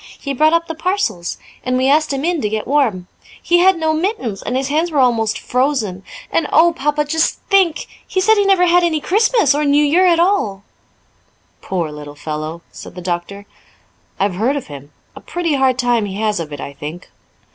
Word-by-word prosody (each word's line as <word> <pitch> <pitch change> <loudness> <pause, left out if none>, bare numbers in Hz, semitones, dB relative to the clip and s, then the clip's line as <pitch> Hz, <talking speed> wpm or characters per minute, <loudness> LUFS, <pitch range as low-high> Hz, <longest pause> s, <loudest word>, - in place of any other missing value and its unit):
He 280 - -4
brought 310 +4 +3
up 335 0 +2
the 325 - -4
parcels, 315 - -2 0.3
and 255 0 0
we 260 +1 +1
asked 305 +2 +3
him 275 +2 -2
in 345 -3 0
to 210 - -1
get 215 0 -3
warm. 240 -10 +1 0.3
He 345 0 +2
had 375 0 +4
no 320 -1 0
mittens, 315 - -2
and 255 - -2
his 265 0 -1
hands 315 +4 +1
were 305 - -3
almost 230 -5 +2
frozen. 250 -8 -1 0.3
And, 330 - +1
oh, 335 +3 +5
Papa, 295 0 0
just 320 +2 0
think! 375 -5 +3 0.2
he 375 - -1
said 435 +4 +4
he 410 -2 +2
never 385 -2 +4
had 355 0 +4
any 325 -3 +1
Christmas 415 - +2
or 295 +1 0
New 290 +1 +3
Year 350 +6 +3
at 340 -2 +3
all." 340 - +1 1.0
"Poor 170 -5 -3
little 150 -1 -9
fellow!" 155 +2 -6
said - - -11
the 180 - -7
doctor. 180 +3 -4 0.7
"I've 195 -1 +1
heard 245 +8 +1
of 285 - -4
him; 140 +1 -11 0.2
a - - -11
pretty 345 -3 -2
hard 265 -2 +2
time 240 -4 +1
he 190 - -6
has 210 -2 -1
of 155 -2 -6
it, 145 - -7
I 140 - -7
think." 155 +5 -9
275 Hz, 205 wpm, -17 LUFS, 200-335 Hz, 1.0 s, oh